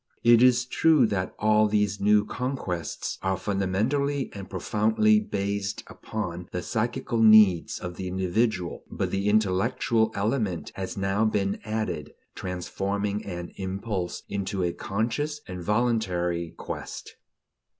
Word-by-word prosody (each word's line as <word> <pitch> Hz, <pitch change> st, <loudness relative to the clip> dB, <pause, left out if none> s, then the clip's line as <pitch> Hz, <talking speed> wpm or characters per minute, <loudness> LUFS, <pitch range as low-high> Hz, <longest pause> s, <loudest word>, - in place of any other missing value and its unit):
It 120 Hz, 0 st, +7 dB
is 125 Hz, -1 st, +5 dB
true 150 Hz, +1 st, +4 dB
that 95 Hz, -4 st, -2 dB
all 110 Hz, 0 st, +4 dB
these 105 Hz, -1 st, +1 dB
new 105 Hz, +1 st, +4 dB
conquests 115 Hz, -, -4 dB
are 95 Hz, 0 st, 0 dB
fundamentally 115 Hz, +9 st, 0 dB
and 100 Hz, -2 st, -8 dB
profoundly 110 Hz, -, +2 dB
based 100 Hz, -, -3 dB
upon 90 Hz, -5 st, -6 dB
the 90 Hz, -, -3 dB
psychical 115 Hz, 0 st, -1 dB
needs 110 Hz, -6 st, +6 dB
of 90 Hz, -1 st, -7 dB
the 95 Hz, -, -4 dB
individual; 95 Hz, 0 st, -1 dB
but -, -, -2 dB
the 100 Hz, +1 st, 0 dB
intellectual 110 Hz, +3 st, +2 dB
element 105 Hz, -4 st, -1 dB
has 95 Hz, 0 st, -5 dB
now 95 Hz, +2 st, +1 dB
been 100 Hz, -2 st, 0 dB
added, 110 Hz, 0 st, -3 dB, 0.2 s
transforming 100 Hz, +3 st, -3 dB
an 85 Hz, -2 st, -5 dB
impulse 95 Hz, -1 st, -3 dB
into 100 Hz, -1 st, -2 dB
a 85 Hz, -1 st, 0 dB
conscious 115 Hz, -, -2 dB
and 90 Hz, -1 st, -6 dB
voluntary 90 Hz, -6 st, 0 dB
quest. -, -, -7 dB
100 Hz, 125 wpm, -26 LUFS, 95-115 Hz, 0.2 s, It